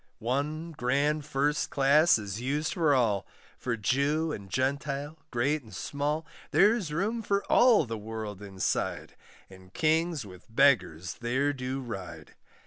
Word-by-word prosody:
One 150 +7 -2
grand 145 +2 0
first 145 +2 0
class 150 +4 +5
is 105 +1 -5
used 145 +5 -1
for 160 -6 +3
all, 110 -7 +1 0.3
For 120 -2 -2
Jew 145 +8 +1
and 100 -8 -7
Gentile, 140 +5 -2
great 140 +5 0
and 110 -6 -13
small; 145 +6 -2 0.2
There's 205 -4 +3
room 205 +9 -1
for 200 -2 0
all 240 - +6
the 115 -2 -5
world 105 -2 -6
inside, 95 -2 -2 0.3
And 95 -1 -16
kings 160 -3 +1
with 90 -2 -13
beggars 95 - +2
there 130 +5 +1
do 130 0 -4
ride. 90 - -8
135 Hz, 135 wpm, -29 LUFS, 110-155 Hz, 0.3 s, all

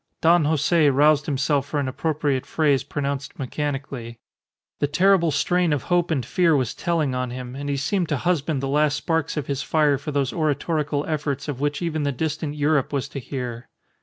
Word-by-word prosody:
Don 165 -1 +4
Jose 155 +1 +3
roused 145 +2 +3
himself 140 -1 0
for 145 - -2
an 140 - -1
appropriate 145 -1 -1
phrase 145 -5 +2
pronounced 140 -1 -4
mechanically. 135 -4 -4 0.6
The 145 - +1
terrible 175 +3 +3
strain 175 +4 +1
of 145 -3 0
hope 175 -1 +1
and 135 -8 0
fear 170 +3 +3
was 130 -5 0
telling 165 -6 0
on 125 0 -2
him, 125 0 -7
and 145 +1 -5
he 140 - 0
seemed 170 +5 -1
to 150 - +1
husband 155 -3 0
the - - 0
last 150 +1 +2
sparks 160 0 -1
of 150 - -2
his 140 -1 -2
fire 150 -3 +2
for 150 - -5
those 140 -2 0
oratorical 150 -1 0
efforts 145 -3 -2
of 140 -4 -4
which 145 +3 -1
even 160 -2 -1
the 145 -1 0
distant 150 +2 -3
Europe 150 -2 +1
was 140 -1 -1
to 140 - -5
hear. 125 -2 -6
145 Hz, 195 wpm, -23 LUFS, 135-155 Hz, 0.6 s, Don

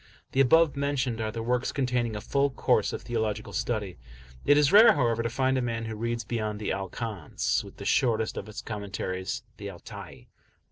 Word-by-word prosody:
The 135 - +3
above 160 +2 +5
mentioned 135 -5 -1
are 110 -1 -2
the 115 +1 -4
works 125 +2 0
containing 125 -4 0
a 105 - -4
full 140 +5 +1
course 130 - +1
of - - -5
theological 110 -3 -2
study; 105 -6 -2 0.5
it 145 +1 +6
is 145 -1 +4
rare, 220 +3 +9
however, 115 -5 +1
to 115 - -1
find 130 +2 +1
a - - 0
man 115 -2 -2
who 110 0 -4
reads 115 +1 -2
beyond 110 -3 -3
the 105 - -2
"Al 95 0 -3
Kanz," 105 -7 -2
with - - -13
the - - -8
shortest 110 -3 +2
of 105 - -6
its 110 - -7
commentaries, 95 -3 -4
the 100 -1 -6
"Al 90 - -9
Tai." - - -10
115 Hz, 200 wpm, -28 LUFS, 105-130 Hz, 0.5 s, rare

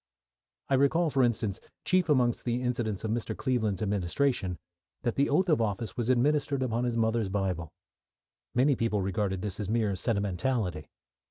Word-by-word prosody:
I - - -1
recall, 150 +5 +3
for 135 - +2
instance, 110 -5 0 0.3
chief 185 -3 +2
amongst 125 -5 +2
the 120 +1 -1
incidents 115 -5 -1
of 110 - -1
Mr. 115 0 -2
Cleveland's 110 -7 0
administration, 100 0 0 0.5
that 120 - 0
the 140 +4 +1
oath 185 +6 +3
of 155 -8 +3
office 105 -1 -2
was 120 0 -2
administered 140 +1 +2
upon 120 0 0
his 120 -1 -1
mother's 110 -2 +1
Bible. 95 -5 -2 0.8
Many 135 +3 +4
people 110 -4 0
regarded 95 -1 -1
this 100 -1 -3
as 105 -2 -3
mere 110 -3 +1
sentimentality. 100 - -1
115 Hz, 160 wpm, -29 LUFS, 100-130 Hz, 0.8 s, Many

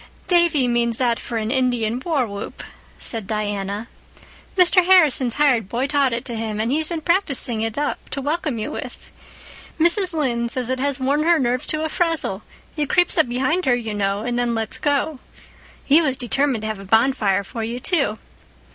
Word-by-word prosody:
"Davy 340 -7 +3
means 235 -1 +1
that 240 -3 +1
for 235 - -5
an 220 0 -2
Indian 245 -3 0
war 305 -7 +1
whoop," 200 -2 -7 0.3
said 225 -5 -3
Diana. 205 0 -3 0.7
"Mr. 365 0 +5
Harrison's 310 -10 +4
hired 255 -9 +2
boy 245 +4 -1
taught 280 -2 +2
it 235 0 -3
to 240 - -4
him, 220 -1 -3
and 225 +3 0
he's 310 +2 0
been 330 -1 -4
practicing 285 - 0
it 225 +1 -3
up 290 0 -3
to 280 - -4
welcome 295 -2 -2
you 215 - -4
with. - - -8 0.7
Mrs. 360 +3 +3
Lynde 245 -7 -1
says 255 0 -2
it 260 - -1
has 280 0 -1
worn 275 +3 +1
her 335 +2 +4
nerves 250 -2 0
to 310 0 0
a - - 0
frazzle. 320 - -1 0.3
He 300 -2 -1
creeps 355 +4 +2
up 320 -6 +3
behind 265 +9 0
her, 250 - +4
you 225 -3 -4
know, 200 0 -1
and 240 0 -1
then 240 -1 0
lets 220 -1 -3
go. 290 0 0 0.7
He 295 +4 +5
was 270 -5 0
determined 260 -2 0
to - - -2
have 215 -2 -4
a - - -9
bonfire 215 -2 +2
for 225 +3 -6
you, 235 +2 -4
too. 275 - 0
255 Hz, 190 wpm, -21 LUFS, 225-300 Hz, 0.7 s, Mr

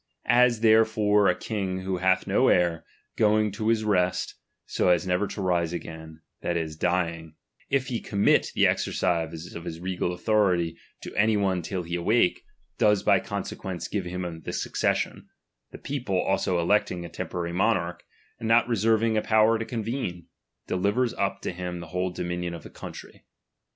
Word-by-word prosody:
As 120 -2 +4
therefore 110 -2 +4
a 90 - +3
king 95 -2 -3
who 95 0 -2
hath 95 +1 +2
no - - +3
heir, 85 -2 +2 0.4
S"oing 110 -1 +3
to 110 +1 -3
his 115 -1 +2
rest 90 -4 +1 0.3
so - - +1
as 90 -1 +3
never 90 +3 +1
to 100 - -5
rise 85 -2 +1
again, 80 -2 -8 0.2
that 85 - -1
is, 80 -2 -3
*iying, 85 -3 -1 0.4
if 140 -2 +1
he 120 -3 -2
commit 100 -1 +2
the - - +4
exercise 85 -1 -1
of 85 - -7
his 80 -1 -6
regal 90 0 -2
Uthority 90 -3 +1 0.3
to - - -9
any 110 +1 +3
one 95 -3 +1
till 90 +2 -4
he 85 +1 -7
awake, 90 +3 +2 0.4
does 105 -2 +3
by - - +4
conse - - -5
*luence 90 -2 -5
give 100 -3 -2
him 90 -2 -5
the - - -6
succession; - - -1 0.4
the - - -10
people 120 -10 -2
also 95 -1 +1
electing 90 -1 +1
a - - -5
temporary 85 -1 -4
monarch, 90 -3 0 0.4
and 115 - -4
not 115 +1 +4
reserving 115 0 +2
^ 110 - +1
power 110 0 +4
to 115 - -3
convene, 110 -7 -4 0.4
delivers 105 +7 0
up 100 0 -2
to - - -2
him 90 0 -5
the 85 -2 -9
whole 90 +1 -1
*3.ominion 90 0 -3
of 80 - -10
the - - -11
country. - - -10
95 Hz, 170 wpm, -26 LUFS, 85-110 Hz, 0.4 s, As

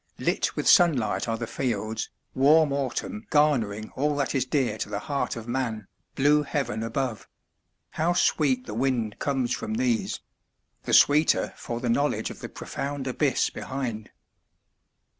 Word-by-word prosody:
Lit - - 0
with - - -2
sunlight 145 - +4
are 115 0 -1
the 115 - -3
fields, 110 -3 -3 0.2
warm 145 +2 +4
autumn 205 - -3
garnering 115 -9 +1
all 145 +2 0
that 140 -2 -1
is 130 -3 +1
dear 125 -6 0
to - - -3
the - - -3
heart 145 -3 -1
of 115 -1 -8
man, 120 -5 -2 0.3
blue 145 +2 +4
heaven 140 -7 -2
above 115 0 -3 0.6
how 165 +3 +1
sweet 135 -7 +2
the - - -6
wind 120 -3 -1
comes 130 -3 0
from 220 - -3
these! 230 -5 0 0.7
the - - -2
sweeter 150 +2 +4
for 120 0 -5
the 125 - -3
knowledge 140 +5 0
of - - -11
the - - -7
profound 140 -1 -5
abyss 135 +2 +1
behind. 120 -5 -5
135 Hz, 150 wpm, -26 LUFS, 115-150 Hz, 0.7 s, sunlight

